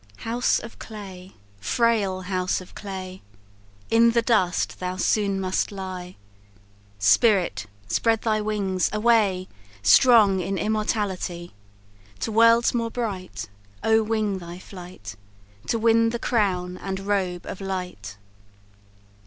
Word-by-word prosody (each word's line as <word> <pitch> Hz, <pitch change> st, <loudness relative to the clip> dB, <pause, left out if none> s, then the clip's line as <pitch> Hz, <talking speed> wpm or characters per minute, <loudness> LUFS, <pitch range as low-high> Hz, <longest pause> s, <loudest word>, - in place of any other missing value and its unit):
"House 240 Hz, +2 st, +1 dB
of 230 Hz, -, -9 dB
clay! 195 Hz, -4 st, -10 dB, 0.3 s
frail 200 Hz, -, +1 dB
house 185 Hz, 0 st, -1 dB
of 185 Hz, -, -13 dB
clay! 190 Hz, -2 st, -7 dB, 0.7 s
In 230 Hz, 0 st, +5 dB
the 235 Hz, 0 st, +2 dB
dust 190 Hz, -7 st, +1 dB
thou 180 Hz, 0 st, -3 dB
soon 200 Hz, +1 st, +1 dB
must 190 Hz, +1 st, -1 dB
lie; 185 Hz, -2 st, -7 dB, 0.8 s
Spirit! 105 Hz, -, +3 dB, 0.2 s
spread 225 Hz, -, +1 dB
thy 215 Hz, -2 st, +1 dB
wings 200 Hz, -3 st, 0 dB
away, 210 Hz, -4 st, +2 dB, 0.4 s
Strong 205 Hz, -, +6 dB
in 195 Hz, +2 st, -2 dB
immortality; 205 Hz, -5 st, -2 dB, 0.7 s
To 225 Hz, -, -2 dB
worlds 230 Hz, +2 st, +5 dB
more 230 Hz, -1 st, -1 dB
bright 205 Hz, -6 st, -5 dB, 0.4 s
Oh 220 Hz, 0 st, +4 dB
wing 215 Hz, -3 st, -1 dB
thy 170 Hz, 0 st, -9 dB
flight, 180 Hz, -, -10 dB, 0.5 s
To 230 Hz, -, +1 dB
win 230 Hz, 0 st, +3 dB
the 235 Hz, -, -2 dB
crown 185 Hz, -7 st, 0 dB
and 190 Hz, 0 st, -5 dB
robe 190 Hz, -3 st, -1 dB
of 195 Hz, -, -7 dB
light. 180 Hz, -, -5 dB
195 Hz, 120 wpm, -24 LUFS, 185-225 Hz, 0.8 s, Strong